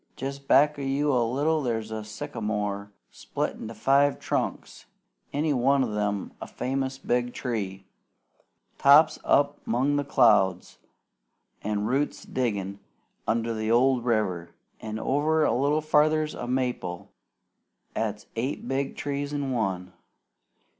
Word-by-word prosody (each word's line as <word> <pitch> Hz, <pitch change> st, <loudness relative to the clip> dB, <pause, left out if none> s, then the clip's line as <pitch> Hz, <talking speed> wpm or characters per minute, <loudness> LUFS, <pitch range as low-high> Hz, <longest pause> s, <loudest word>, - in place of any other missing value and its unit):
Jest 135 Hz, +1 st, -6 dB
back 150 Hz, +1 st, +4 dB
o' -, -, -4 dB
you 140 Hz, +2 st, +1 dB
a 125 Hz, -, +3 dB
little 145 Hz, +7 st, +1 dB
there's 110 Hz, -4 st, -2 dB
a 110 Hz, -1 st, -4 dB
sycamore 105 Hz, -4 st, -4 dB, 0.2 s
split -, -, -3 dB
into 115 Hz, +1 st, -7 dB
five 140 Hz, +5 st, +3 dB
trunks, -, -, -3 dB, 0.4 s
any 150 Hz, +1 st, 0 dB
one 135 Hz, +1 st, +3 dB
o' 120 Hz, -, -2 dB
them 105 Hz, -1 st, -2 dB
a -, -, -5 dB
famous 135 Hz, 0 st, -3 dB
big 125 Hz, -2 st, -1 dB
tree, 100 Hz, -6 st, -4 dB, 0.9 s
tops 150 Hz, +3 st, +6 dB
up 145 Hz, 0 st, +2 dB
'mong 135 Hz, +5 st, +1 dB
the 145 Hz, -, 0 dB
clouds, 105 Hz, -9 st, +3 dB, 0.8 s
an' 105 Hz, 0 st, -1 dB
roots 140 Hz, +5 st, -1 dB
diggin' 100 Hz, -6 st, -2 dB, 0.5 s
under 115 Hz, 0 st, 0 dB
the 110 Hz, 0 st, -2 dB
old 125 Hz, +1 st, +3 dB
river; 100 Hz, -8 st, -1 dB, 0.2 s
an' 110 Hz, 0 st, -5 dB
over 150 Hz, +6 st, +1 dB
a -, -, +2 dB
little 145 Hz, +4 st, +2 dB
farther's 155 Hz, 0 st, +2 dB
a 120 Hz, -, -6 dB
maple 125 Hz, -9 st, -2 dB, 0.8 s
'at's 105 Hz, -2 st, -2 dB
eight 125 Hz, +5 st, -3 dB
big 135 Hz, +1 st, -2 dB
trees 145 Hz, 0 st, -3 dB
in 145 Hz, -2 st, -2 dB
one. 95 Hz, -6 st, -2 dB
125 Hz, 135 wpm, -26 LUFS, 110-140 Hz, 0.9 s, tops